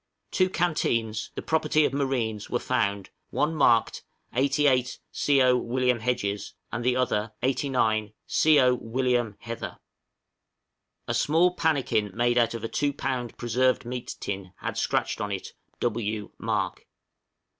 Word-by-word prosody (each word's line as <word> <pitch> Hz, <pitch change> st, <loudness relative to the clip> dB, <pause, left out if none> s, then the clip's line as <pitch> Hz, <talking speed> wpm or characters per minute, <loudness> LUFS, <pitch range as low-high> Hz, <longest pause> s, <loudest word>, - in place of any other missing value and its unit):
Two 185 Hz, 0 st, +2 dB
canteens, 115 Hz, -, 0 dB
the -, -, -5 dB
property 155 Hz, -1 st, +2 dB
of -, -, -1 dB
marines, 125 Hz, -7 st, -1 dB
were -, -, +1 dB
found, 100 Hz, -1 st, -1 dB, 0.2 s
one 150 Hz, +2 st, 0 dB
marked 120 Hz, -7 st, +3 dB, 0.3 s
"88 135 Hz, -1 st, +2 dB, 0.2 s
C^o. 130 Hz, -3 st, +3 dB
Wm. 125 Hz, 0 st, +1 dB
Hedges," 105 Hz, -4 st, -2 dB, 0.2 s
and 120 Hz, 0 st, -3 dB
the 125 Hz, 0 st, +2 dB
other 110 Hz, -4 st, 0 dB
"89 125 Hz, -5 st, +1 dB, 0.2 s
C^o. 135 Hz, -5 st, +4 dB
Wm. 120 Hz, -2 st, 0 dB
Hether." 115 Hz, 0 st, -6 dB, 1.3 s
A -, -, 0 dB
small 170 Hz, +4 st, +3 dB
pannikin 145 Hz, -11 st, +1 dB
made 120 Hz, +1 st, +3 dB
out 115 Hz, 0 st, +2 dB
of 115 Hz, -, -6 dB
a -, -, -1 dB
two 145 Hz, +4 st, 0 dB
pound 125 Hz, -4 st, -3 dB
preserved 125 Hz, +1 st, +1 dB
meat 125 Hz, 0 st, -5 dB
tin 95 Hz, -2 st, -5 dB
had -, -, -3 dB
scratched -, -, 0 dB
on 105 Hz, -, -2 dB
it 95 Hz, -2 st, -4 dB, 0.3 s
"W. 110 Hz, -3 st, -2 dB
Mark." -, -, -2 dB
125 Hz, 135 wpm, -26 LUFS, 110-135 Hz, 1.3 s, C^o